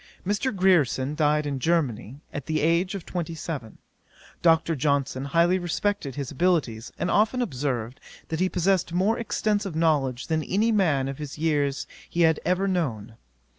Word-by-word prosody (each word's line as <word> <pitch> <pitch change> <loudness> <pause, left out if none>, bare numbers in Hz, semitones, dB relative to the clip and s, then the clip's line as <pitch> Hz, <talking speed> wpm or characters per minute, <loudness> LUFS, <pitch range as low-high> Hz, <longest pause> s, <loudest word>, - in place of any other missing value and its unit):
Mr. 205 +7 0
Grierson 155 -8 +2
died 150 -1 +2
in 140 -2 -2
Germany, 135 -5 -1
at 145 - -6
the 155 -1 0
age 170 +5 +2
of 190 - -6
twenty 170 -2 -4
seven. 145 -8 -6 0.6
Dr. 165 -1 +3
Johnson 140 -1 0
highly 170 +5 +3
respected 175 -4 -2
his 140 -3 -4
abilities, 140 -8 0
and 180 - -1
often 220 +4 +2
observed, 130 - -2 0.3
that 160 - -2
he 185 0 +2
possessed 185 -1 +1
more 195 +6 +2
extensive 210 -5 -1
knowledge 145 -6 +1
than 160 -1 0
any 210 +8 +1
man 155 -11 +2
of 135 +1 -5
his 150 -1 -6
years 145 -3 0 0.2
he 175 - -1
had 160 -2 +4
ever 185 +2 +1
known. 125 - -2
160 Hz, 160 wpm, -25 LUFS, 140-185 Hz, 0.6 s, had